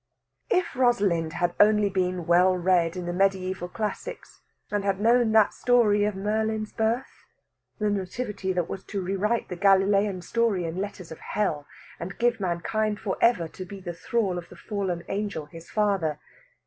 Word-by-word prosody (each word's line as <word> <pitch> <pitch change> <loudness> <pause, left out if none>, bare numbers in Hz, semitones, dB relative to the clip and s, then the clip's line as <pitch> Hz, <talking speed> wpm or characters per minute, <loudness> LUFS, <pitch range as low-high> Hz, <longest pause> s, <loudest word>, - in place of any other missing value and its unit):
If 365 - +1
Rosalind 200 -11 +2
had 175 0 0
only 210 0 +5
been 185 -2 -1
well 180 +2 +4
read 175 -1 +2
in 180 - -4
the 175 - -2
mediæval 185 -1 0
classics, 225 - -5 0.3
and 205 -1 0
had 195 -1 0
known 230 +1 +4
that 220 -2 +5
story 220 -4 +3
of 210 -1 -1
Merlin's 215 +2 -1
birth 230 +4 -2 0.5
the 210 - 0
Nativity 195 0 -3
that 175 -2 -1
was 190 - -6
to 200 - -4
rewrite 195 +5 -1
the 180 - -4
Galilean 195 0 +3
story 225 -6 0
in 165 +2 -4
letters 200 -4 -6
of 160 - -8
Hell, 155 -9 -2 0.3
and 180 +3 -6
give 240 -1 +1
mankind 205 +4 -1
for 195 -3 -2
ever 205 -9 +3
to 185 - -8
be 195 +2 -9
the 175 -2 -6
thrall 185 +1 -1
of 170 - -12
the - - -12
fallen 190 -5 -3
angel 200 -6 -3
his 165 +3 -13
father! 195 -8 +1
195 Hz, 170 wpm, -26 LUFS, 180-215 Hz, 0.5 s, only